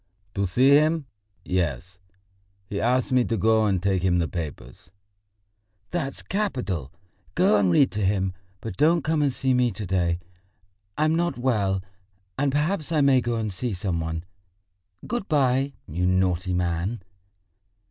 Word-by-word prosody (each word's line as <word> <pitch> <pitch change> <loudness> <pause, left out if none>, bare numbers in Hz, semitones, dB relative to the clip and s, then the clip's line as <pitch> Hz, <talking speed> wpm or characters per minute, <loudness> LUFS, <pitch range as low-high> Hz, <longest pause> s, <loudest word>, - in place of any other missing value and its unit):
"To 100 0 0
see 125 +9 +3
him, 155 +1 +4 0.4
yes. 90 -1 -2 0.7
He 100 +1 -4
asked 125 +3 +1
me 130 -1 +4
to 115 - -1
go 110 +2 +3
and 95 -2 +1
take 95 -2 +1
him 90 -1 +2
the 85 -2 +1
papers." 75 -7 -7 1.0
"That's 150 -6 -3
capital. 125 - -2 0.4
Go 105 - +4
and 95 -3 +3
read 135 +9 +4
to 105 -1 -2
him. 95 -1 +1 0.3
But 110 -4 -6
don't 160 +3 +3
come 155 0 +1
and 145 -2 +2
see 130 +1 0
me 125 -1 +3
to 105 0 -6
day. 85 -2 +1 0.8
I 155 - +2
am 155 - +2
not 175 -2 0
well, 100 -7 0 0.5
and 140 0 +1
perhaps 155 +3 -1
I 155 -2 +3
may 135 -2 +5
go 120 0 -1
and 110 -3 -2
see 115 +4 -3
some 90 -2 -2
one. 80 +1 -4 0.8
Good 240 -5 -3
bye, 135 -2 +2
you 90 +3 -1
naughty 90 -1 +1
man." 90 +4 -1
110 Hz, 155 wpm, -25 LUFS, 90-140 Hz, 1.0 s, may